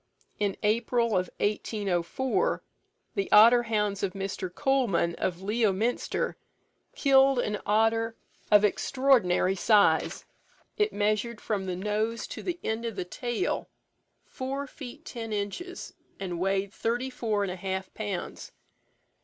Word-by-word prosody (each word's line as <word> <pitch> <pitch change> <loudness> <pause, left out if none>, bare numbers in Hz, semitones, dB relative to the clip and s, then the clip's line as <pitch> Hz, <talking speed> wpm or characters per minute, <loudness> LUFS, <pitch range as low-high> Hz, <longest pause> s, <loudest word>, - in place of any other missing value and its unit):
In 205 -2 0
April 235 +2 +2
1804, 205 - -1 0.5
the 395 - -2
otter 230 +3 +8
hounds 210 -3 -1
of 195 -2 -1
Mr. 195 -2 -4
Coleman, 215 -7 +1
of 180 0 -2
Leominster, 215 +2 0 0.6
killed 270 -1 +5
an 210 -4 -1
otter 225 +2 +2 0.4
of 210 0 +7
extraordinary 210 -5 +2
size. 200 -4 +3 0.5
It 425 0 +1
measured 215 +2 0
from 200 -3 -2
the 180 - -2
nose 210 +4 -1
to - - -6
the 350 -1 -3
end 220 +1 -2
of 230 -3 -3
the 185 -2 -3
tail, 240 +5 -2 0.6
four 275 +1 -4
feet 280 +2 -10
ten 225 -3 -6
inches, 210 - -4 0.3
and 180 -3 -4
weighed 195 +2 0
thirty 245 +3 -1
four 220 -5 -1
and 195 - -2
a - - -4
half 190 +1 -4
pounds. 205 -4 -5
215 Hz, 125 wpm, -28 LUFS, 195-240 Hz, 0.6 s, otter